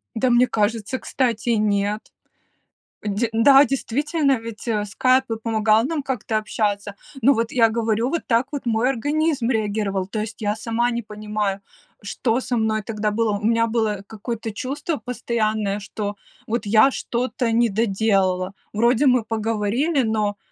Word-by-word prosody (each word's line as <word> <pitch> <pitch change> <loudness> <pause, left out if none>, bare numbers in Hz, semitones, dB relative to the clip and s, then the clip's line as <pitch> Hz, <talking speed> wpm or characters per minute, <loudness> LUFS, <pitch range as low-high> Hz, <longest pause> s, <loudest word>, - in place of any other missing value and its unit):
Да, 250 +3 +1
мне 240 +1 +5
кажется, 225 +2 -1
кстати, 240 -3 -1
нет. 210 -1 +1 1.1
Де 210 +3 0
да, 270 +5 +7
действительно, 275 +2 0
ведь 225 0 -9 0.2
"Скайп" 255 +4 +2
и - - 0
помогал 220 -1 +2
нам 305 +3 -1
как-то 240 -4 -2
общаться. 205 -1 -2 0.3
Ну 275 +5 +6
вот 230 -2 -1
я 230 -3 +4
говорю, 225 +1 0
вот 335 +3 -1
так 235 +1 +3
вот 285 - -4
мой 230 +1 +1
организм 290 0 0
реагировал, 205 -4 -1
то 215 +2 -4
есть 220 +1 -7
я 210 0 0
сама 230 +2 0
не 235 0 -2
понимаю, 210 -2 -3 0.4
что 225 +4 -1
со 250 -1 -2
мной 220 -1 +1
тогда 210 0 -2
было. 215 -1 0
У 205 - -10
меня 230 0 +3
было 220 -3 -1
какое-то 225 +1 -5
чувство 285 +8 -3
постоянное, 215 -4 -1
что, 205 0 -5 0.3
вот, 235 +1 -2
я 215 +6 +5
что-то 245 -1 -2
не 235 +1 +3
доделала. 195 -3 +1 0.2
Вроде 235 +5 +2
мы 250 -4 +4
поговорили, 225 +7 0
но, 215 -2 0
225 Hz, 150 wpm, -22 LUFS, 210-245 Hz, 1.1 s, да